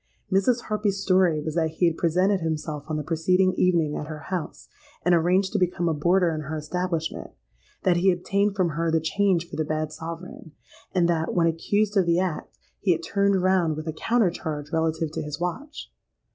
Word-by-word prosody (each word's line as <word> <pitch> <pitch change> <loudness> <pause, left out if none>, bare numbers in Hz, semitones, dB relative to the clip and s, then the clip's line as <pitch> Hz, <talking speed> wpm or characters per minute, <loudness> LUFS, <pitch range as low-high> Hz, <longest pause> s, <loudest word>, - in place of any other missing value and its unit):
Mrs. 215 +6 +2
Harpy's 210 -3 -1
story 185 -5 +3
was 155 +1 -4
that 160 -1 +1
he 180 - +3
had 165 -2 +2
presented 185 +4 +2
himself 155 -2 -3
on 155 - -2
the 150 - -3
preceding 180 +4 +2
evening 170 -5 +2
at 150 - -4
her 155 -1 -6 0.2
house, 175 -4 -4 0.4
and 180 - +4
arranged 180 +4 +2
to 210 - +1
become 175 -1 0
a 165 - +2
boarder 175 +3 +2
in 155 - -3
her 155 +2 -5
establishment; 165 +1 -3 0.5
that 180 -2 +3
he 185 +3 +3
obtained 200 +3 +1
from 185 -3 +1
her 165 +2 -1
the 160 0 +2
change 175 +1 +1
for - - -8
the 155 - +1
bad 155 0 -2
sovereign; 165 0 -8 0.4
and 175 -2 +3
that, 165 -1 0
when 170 -2 +3
accused 205 +6 0
of 185 -3 +3
the 170 0 +3
act, 180 -4 -3 0.2
he 185 - +3
had 165 0 -5
turned 200 0 +1
round 185 -4 +2
with 155 +1 -6
a 160 - -2
counter 225 +2 +1
charge 150 -3 -5
relative 160 -1 0
to - - -4
his 150 -1 -5
watch. 270 - -5
170 Hz, 200 wpm, -25 LUFS, 160-185 Hz, 0.5 s, and